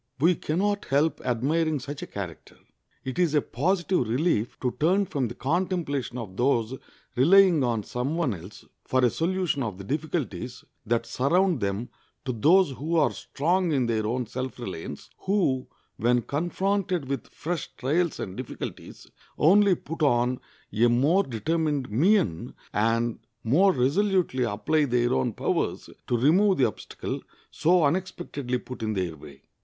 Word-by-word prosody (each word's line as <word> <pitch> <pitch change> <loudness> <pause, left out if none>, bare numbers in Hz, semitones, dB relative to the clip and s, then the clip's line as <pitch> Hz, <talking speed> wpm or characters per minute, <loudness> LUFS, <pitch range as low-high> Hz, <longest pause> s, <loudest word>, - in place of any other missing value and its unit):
We 170 +6 +5
can 155 -1 -3
not 205 +1 0
help 145 +4 +1
admiring 145 +6 0
such 140 +3 -7
a - - -6
character. 90 -6 -8 0.5
It 130 +5 -4
is 170 -4 +2
a 150 - +4
positive 175 - 0
relief 120 -3 0
to 125 -2 -1
turn 185 +6 +3
from 140 -8 -1
the 120 - -8
contemplation 145 - -1
of 105 -6 -7
those 120 -1 +1 0.4
relying 170 +3 +6
on 115 -4 0
some 125 +9 -3
one 155 -9 +1
else 90 +3 -11 0.2
for 130 -1 +2
a 120 - +3
solution 175 -3 0
of 105 -7 -3
the 100 - -8
difficulties 135 - -3 0.2
that 115 +1 +1
surround 165 +8 +2
them 100 +3 -2 0.4
to 130 - -1
those 160 - +4
who 150 +7 -3
are 145 -7 +4
strong 170 - 0
in 135 -4 +2
their 110 -2 0
own 125 +2 -1
self 130 +3 -5
reliance, 90 - -7
who, 185 -10 0 0.3
when 120 +2 +2
confronted 175 - -1
with 135 -4 -3
fresh 170 -1 -4
trials 160 +6 0
and 95 - -5
difficulties, 130 -2 -7 0.3
only 195 +4 +5
put 165 0 -8
on 125 -3 +2 0.3
a 115 +3 +4
more 140 +11 +3
determined 145 - -1
mien, 130 - +2 0.2
and 115 +2 +1 0.2
more 170 - +4
resolutely 155 0 +1
apply 115 +8 +1
their 120 -2 +1
own 65 - +1
powers - - -2 0.2
to 120 - +1
remove 185 - +4
the 130 - +4
obstacle 110 - -5 0.3
so 175 +1 +3
unexpectedly 145 -5 -1
put 125 -1 -9
in 110 -1 -1
their 90 -5 -2
way. 70 -2 -14
135 Hz, 155 wpm, -26 LUFS, 120-170 Hz, 0.5 s, relying